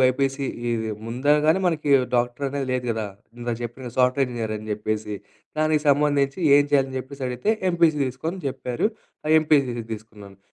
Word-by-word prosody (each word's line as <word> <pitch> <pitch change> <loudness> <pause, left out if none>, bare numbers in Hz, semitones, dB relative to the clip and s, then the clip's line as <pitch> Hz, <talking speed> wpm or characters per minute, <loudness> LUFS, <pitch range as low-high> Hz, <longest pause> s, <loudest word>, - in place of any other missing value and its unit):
BiPC 135 +1 +2 0.2
ఈ - - +1 0.4
ముంద 125 +4 -6 0.2
గానీ 170 +5 +4
మనకి 155 -4 0 0.3
డాక్టరనేది 135 +3 -1
లేదు 125 -1 -1
గదా! 110 -2 -2 0.3
ఇందాక 120 -1 -2
చెప్పిన 120 +1 -7
సాఫ్ట్‌వేర్ 130 +1 +3
ఇంజినీర్ 110 -2 -3
అని 110 - -10
జేప్పేసి, 105 0 -2 0.4
దానికి 155 -1 +2
సంబంధించి 140 0 +2 0.2
ఏం 145 - +4
చేయాలి 135 -1 +4
అని 130 - -6
జేప్పేసి 135 +1 -7
అడిగితే, 125 - 0 0.2
ఎంపీసీ 170 -3 +3
తీసుకో 130 +4 -6
అని 190 - -7
జేప్పారు. 125 - -1 0.5
ఎంపీసీ 140 -5 +2 0.2
తీసుకున్నాను. 105 -3 -10
130 Hz, 155 wpm, -24 LUFS, 120-145 Hz, 0.5 s, గానీ